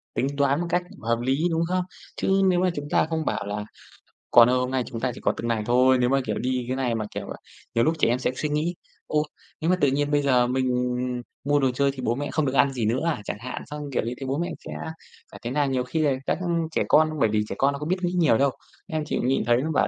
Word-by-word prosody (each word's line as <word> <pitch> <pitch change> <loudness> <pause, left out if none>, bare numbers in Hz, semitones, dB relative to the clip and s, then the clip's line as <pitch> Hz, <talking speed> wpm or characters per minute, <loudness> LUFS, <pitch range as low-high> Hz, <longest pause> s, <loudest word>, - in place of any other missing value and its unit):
Tính 135 - +1
toán 140 +2 +2
một 175 - -2
cách 175 +1 +1 0.2
hợp 115 +1 +1
lý, 130 +2 +1
đúng 165 - +1
không? 185 0 +1 0.3
Chứ 195 0 +2
nếu 180 -1 +3
mà 185 0 +3
chúng 145 0 -5
ta - - +3
không 160 -1 -1
bảo - - -1
là 105 +1 -4 0.7
"Con 115 +1 +8
ơi 130 - +3
hôm 125 +1 -1
nay 130 -2 +1
chúng 115 - -6
ta 130 +1 0
chỉ - - -10
có - - +1
từng 115 - -3
này 115 -2 0
thôi" 130 +2 +4
nếu 125 0 +2
mà, 135 0 +3
kiểu, 105 -1 -1
đi 125 -1 -1
cái 130 - -1
này 125 -3 0
mà, 110 -1 -2
kiểu, - - -4 0.5
nhiều 115 - +4
lúc 160 - +3
trẻ - - +4
em 120 +2 +1
sẽ 130 - 0
suy 150 - -2
nghĩ: 155 +4 -1 0.3
"Ô, 150 0 +1 0.4
nếu 160 - +1
mà 185 - +5
tự 145 - +5
nhiên 145 +1 0
bây 145 0 +3
giờ 125 -3 +3
mình 130 +1 0 0.8
mua 145 +1 +2
đồ 135 -2 +2
chơi 140 +2 +1
thì 135 - -11
bố 120 0 +1
mẹ 145 0 -3
không 155 -2 +1
được 130 - -1
ăn 140 0 +3
gì 120 -4 -1
nữa 120 +6 +1
à?" 155 -10 0
Chẳng - - -4
hạn, 125 +3 -6
xong, 150 0 -7
kiểu, - - +2
"Như 115 - -2
thế 125 - -5
thì 135 - -5
bố 135 +2 -1
mẹ 175 - -1 0.2
sẽ - - -7 0.6
phải - - -11
thế 120 - -3
nào?" 145 0 +1
Nhiều 130 -2 0
khi 160 +6 -3
là 145 -3 +3
các - - 0 0.3
trẻ - - +1
con 155 0 +5
bởi 110 - +3
vì 105 0 +1
trẻ 100 - -3
con 140 +1 +3
nó 140 - -5
có 150 - -4
biết 185 +4 +1
nghĩ 175 - 0
nhiều 155 -10 +4
đâu, 140 -1 +3 0.4
em 155 -3 -2
chỉ - - -2
nhìn 130 +2 +1
thấy 120 0 +4
nó 160 +3 -2
bảo - - +2
135 Hz, 295 wpm, -25 LUFS, 125-150 Hz, 0.8 s, Con